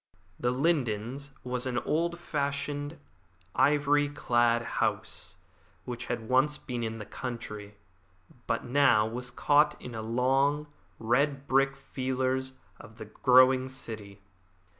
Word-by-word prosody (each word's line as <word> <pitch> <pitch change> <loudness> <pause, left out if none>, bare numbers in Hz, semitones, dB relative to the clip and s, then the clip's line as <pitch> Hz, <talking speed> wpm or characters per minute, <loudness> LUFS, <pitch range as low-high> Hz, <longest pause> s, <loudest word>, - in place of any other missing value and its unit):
The 125 - +1
Lindens 130 -2 0
was 125 0 -2
an 125 -1 -2
old 170 +6 0
fashioned, 145 -1 -3 0.6
ivy 145 +1 +3
clad 120 -4 +2 0.2
house - - -2 0.5
which 120 -1 -6
had 120 -2 -3
once 135 +4 +3
been 125 -2 -5
in 115 -1 -3
the 105 - -7
country, 105 -3 -6 0.7
but 115 - 0
was 120 - -9
now 120 -4 +3
caught 150 +1 +3
in 125 - -8
the 110 -1 -5
long, 135 +6 +1 0.3
red 140 +5 +1
brick 135 +1 +3
feelers 130 -1 -2 0.3
of 110 0 -13
the 110 - -7
growing 130 +3 +4
city. 110 -6 -8
130 Hz, 120 wpm, -29 LUFS, 115-140 Hz, 0.7 s, growing